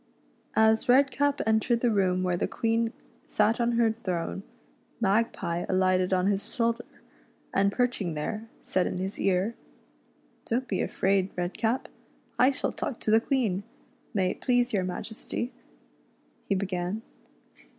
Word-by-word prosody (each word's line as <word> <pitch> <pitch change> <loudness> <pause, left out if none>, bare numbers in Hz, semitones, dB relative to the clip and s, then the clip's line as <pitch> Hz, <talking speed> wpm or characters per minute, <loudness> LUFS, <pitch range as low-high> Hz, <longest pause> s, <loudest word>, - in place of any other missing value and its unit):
As 220 +1 +4
Redcap 280 +2 +4
entered 225 +2 +2
the 240 - +3
room 185 -3 +2
where 180 -1 +1
the - - 0
Queen 230 0 0 0.3
sat 215 +3 +2
on 235 0 +2
her 230 -1 +3
throne, 190 -5 -3 0.6
Magpie 195 -5 +1
alighted 185 0 +2
on 185 -1 +2
his 200 0 -1
shoulder, 235 0 +1 0.7
and 200 0 +3
perching 220 -9 0
there, 215 +9 -4
said 185 - +1
in - - -3
his 190 +2 -4
ear: 195 +3 +1 0.5
" - - -37
Don't 255 +3 -1
be 190 - -1
afraid, 190 0 +1
Redcap, 220 +7 -1 0.5
I 255 - +7
shall 280 - -1
talk 245 - -4
to 215 - 0
the 220 +1 +6
Queen. 230 -9 0 0.5
May 185 -3 +1
it - - -9
please 245 -1 +2
your 195 -3 +2
Majesty," 220 +6 -4 1.0
he 200 - +3
began. 185 +2 -2
215 Hz, 140 wpm, -28 LUFS, 185-235 Hz, 1.0 s, I